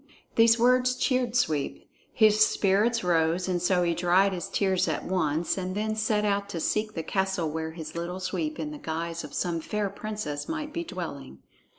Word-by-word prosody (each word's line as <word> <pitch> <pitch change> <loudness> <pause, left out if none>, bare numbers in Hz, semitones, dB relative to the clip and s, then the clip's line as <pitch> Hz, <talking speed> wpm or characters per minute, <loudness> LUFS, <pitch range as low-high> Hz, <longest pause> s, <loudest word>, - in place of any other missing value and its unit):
These 230 0 +6
words 250 +1 +3
cheered 250 -2 0
Sweep. 155 - 0 0.2
His 215 -1 +5
spirits 215 +3 +2
rose, 170 +1 +1
and 180 -2 0
so 180 0 +2
he 170 -1 +1
dried 180 +3 +3
his 175 -2 -4
tears 190 -3 +1
at 160 - -2
once 170 -1 0
and 185 0 -4
then 215 +1 -1
set 215 -1 +1
out 200 0 0
to 170 - -4
seek 215 +6 -1
the 165 - -3
castle 190 -4 -1
where 160 0 -4
his 160 -2 -7
Little 175 +2 -4
Sweep 305 - -3
in 300 - -4
the 300 - -8
guise 165 - -4
of 150 - -9
some 170 -2 -1
fair 205 +3 -2
princess 200 -9 -5
might 305 -1 -4
be 340 - -2
dwelling. 140 - -7
190 Hz, 190 wpm, -27 LUFS, 170-215 Hz, 0.2 s, These